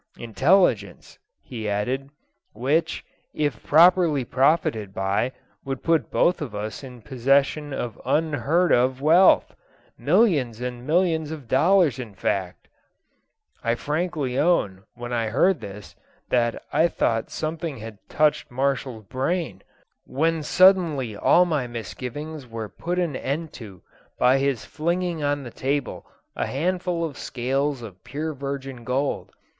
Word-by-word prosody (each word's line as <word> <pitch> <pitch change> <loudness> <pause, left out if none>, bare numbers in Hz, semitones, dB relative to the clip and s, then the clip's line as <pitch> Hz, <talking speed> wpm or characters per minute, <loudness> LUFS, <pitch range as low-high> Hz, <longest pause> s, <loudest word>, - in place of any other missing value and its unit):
'Intelligence,' 120 - +1 0.2
he 110 -4 -5
added, 125 +7 -2 0.4
'which, 140 +9 0 0.3
if 145 -3 -1
properly 165 -3 +4
profited 125 - +1
by, 100 +6 0 0.3
would 135 -1 -5
put 165 -1 +1
both 180 -1 +2
of 135 -8 -5
us 105 +5 -5
in 125 -4 -11
possession 140 +4 +1
of 120 -4 -5
unheard 160 +3 +1
of 130 +1 +3
wealth 165 +6 +5 0.4
millions 145 - +2
and 125 0 -5
millions 160 -2 +1
of 155 -6 -8
dollars 155 - +3
in 110 -6 -7
fact.' 95 -2 -3 1.0
I 115 0 +1
frankly 150 -2 -2
own, 105 - +1
when 120 +1 -6
I 115 -2 0
heard 150 - +2
this, 100 +1 -10 0.3
that 120 -2 0
I 160 +3 +4
thought 115 -8 -1
something 155 -2 -4
had 110 -2 -9
touched 150 -1 +1
Marshall's 130 -3 -2
brain, 155 - -2 0.4
when 160 +4 0
suddenly 160 - +3
all 175 +11 +4
my 150 -7 -1
misgivings 125 +6 -7
were 115 -2 -6
put 175 - -4
an 170 -6 0
end 150 +5 -3
to 95 -5 -11 0.3
by 130 +2 +4
his 135 -3 -1
flinging 170 +1 -2
on 145 -1 -1
the 120 - -8
table 140 +2 -3 0.3
a - - -2
handful 175 +3 -1
of 145 -3 -7
scales 135 +1 -2
of 95 -5 -11
pure 155 +4 -4
virgin 135 -2 -6
gold. 130 +4 -2
135 Hz, 130 wpm, -24 LUFS, 120-160 Hz, 1.0 s, wealth